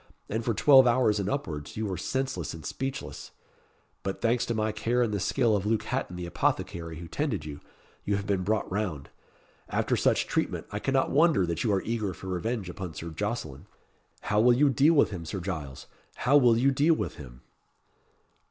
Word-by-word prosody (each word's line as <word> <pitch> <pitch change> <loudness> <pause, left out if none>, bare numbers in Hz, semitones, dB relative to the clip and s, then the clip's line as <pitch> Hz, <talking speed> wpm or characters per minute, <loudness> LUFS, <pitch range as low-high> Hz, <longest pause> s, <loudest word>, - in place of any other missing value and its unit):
And 110 +2 -2
for 115 -1 0
twelve 135 0 +7
hours 120 -4 +3
and 100 0 -1
upwards 80 - -4
you 110 - -1
were 95 -2 -2
senseless 95 - -3
and 80 -2 -10
speechless; 135 - -5 0.7
But 95 0 -4
thanks 120 +1 +1
to 115 - -1
my 110 0 0
care 115 +4 0
and 110 -3 -1
the 100 - 0
skill 115 +3 +2
of 100 - -1
Luke 110 0 +1
Hatton 90 - -3
the 90 0 -5
apothecary 85 -1 -2
who 85 +1 -8
tended 115 - -2
you, 75 -1 -7 0.4
you 100 - 0
have 100 0 -3
been 100 -3 0
brought 105 +4 0
round. 90 -8 -3 0.6
After - - 0
such - - +2
treatment, - - -2
I 105 - -3
cannot 135 +3 +1
wonder 155 - +4
that 85 -1 -2
you 110 - +1
are 95 -2 +1
eager 110 -5 -2
for 95 - -8
revenge 95 +3 -2
upon 90 -2 -6
Sir 85 - -6
Jocelyn. 80 - -4 0.5
How 105 0 +1
will 120 +2 +6
you 140 +3 +4
deal 145 +6 +4
with 140 - +4
him 90 -4 -5
Sir 90 +5 -5
Giles? 80 -8 -5 0.3
How 135 +4 +2
will 120 -5 +6
you 135 +4 +3
deal 150 +5 +3
with - - -4
him?" 65 -3 -11
105 Hz, 200 wpm, -28 LUFS, 90-125 Hz, 0.7 s, twelve